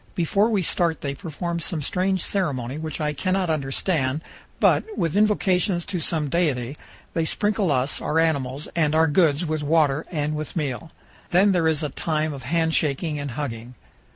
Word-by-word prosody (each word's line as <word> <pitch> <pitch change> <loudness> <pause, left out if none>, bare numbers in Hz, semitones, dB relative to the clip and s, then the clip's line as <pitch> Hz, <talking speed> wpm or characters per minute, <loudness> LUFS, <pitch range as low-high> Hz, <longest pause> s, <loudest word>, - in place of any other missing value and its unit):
Before 195 +6 +2
we 205 -5 +1
start 165 -1 +1
they 140 -1 -2
perform 170 +4 -4
some 165 -2 -2
strange 185 +4 0
ceremony 140 -8 -1
which 160 0 -4
I 150 -1 -1
cannot 185 +2 0
understand, 140 0 -1 0.4
but, 440 - +2
with 165 0 0
invocations 195 -4 +2
to 185 -3 -3
some 160 -2 +2
deity, 140 -5 0 0.4
they 165 - 0
sprinkle 200 +1 0
us, 130 +1 +1
our 155 - -1
animals, 145 -4 0
and 155 -2 +2
our 160 +1 +5
goods 155 0 +3
with 155 -1 -2
water 150 -1 +2
and 150 -3 -2
with 155 0 -5
meal. 150 -1 -3 0.4
Then 195 +3 +4
there 175 -3 +2
is 160 -1 +1
a 150 - -1
time 155 +1 -1
of 135 - -8
handshaking 160 -2 0
and 145 0 -4
hugging. 125 -4 -5
160 Hz, 170 wpm, -24 LUFS, 145-175 Hz, 0.4 s, our